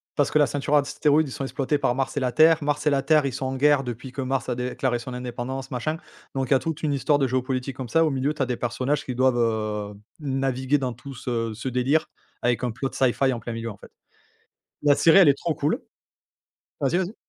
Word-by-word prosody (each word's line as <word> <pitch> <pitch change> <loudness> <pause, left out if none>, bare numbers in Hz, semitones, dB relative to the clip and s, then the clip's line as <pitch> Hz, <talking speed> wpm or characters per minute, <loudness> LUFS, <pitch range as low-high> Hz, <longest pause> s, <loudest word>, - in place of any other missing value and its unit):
parce 145 - +1
que 155 - +3
la 145 - +5
ceinture 145 0 -2
d'astéroïdes, 150 +1 +2
ils - - -8
sont 135 - -5
exploités 135 +2 -1
par 125 -3 0
Mars 135 +2 -2
et - - +3
la 130 -2 0
Terre. 160 +3 +5
Mars 145 +1 -1
et - - +7
la 140 -2 +2
Terre 155 -2 +4
ils 135 - -2
sont 135 - -3
en 130 0 -2
guerre, 145 +1 +4
depuis 125 +1 -6
que 135 - -5
Mars 130 0 -2
a 125 - 0
déclaré 125 0 -1
son 125 +2 -7
indépendance 125 +2 -5
machin. 155 +6 -2 0.4
Donc 135 -1 -1
il - - -11
y - - +7
a - - +3
toute 160 +1 -4
une 150 -2 +1
histoire 145 +1 +2
de 135 - +2
géopolitique 130 +1 -2
comme 130 -3 -6
ça, 165 +8 +4
au - - +2
milieu 135 +1 0
tu 150 - -6
as - - +3
des 125 -1 -3
personnages 130 +4 -1
qui 125 - -4
doivent, 130 0 +3
heu, 110 -3 -1 0.3
naviguer 135 -1 0
dans 130 -2 -2
tout 135 +4 -10
ce 115 -3 -3
ce 110 +4 -6
délire 130 +5 +1 0.3
avec 120 0 +1
un 125 - 0
plot 135 +4 -3
sci-fi 130 +1 +2
en 120 - -4
plein 115 +1 -6
milieu 115 0 -4
en 105 - -12
fait. - - -15 0.9
La 145 -1 +5
série 165 +3 +6
elle 185 -6 +7
est 140 0 +4
trop 170 -2 -1
cool. 150 +1 0 1.0
Vas-y, 140 +5 +1
vas-y. 190 +3 -2
135 Hz, 250 wpm, -24 LUFS, 125-145 Hz, 1.0 s, et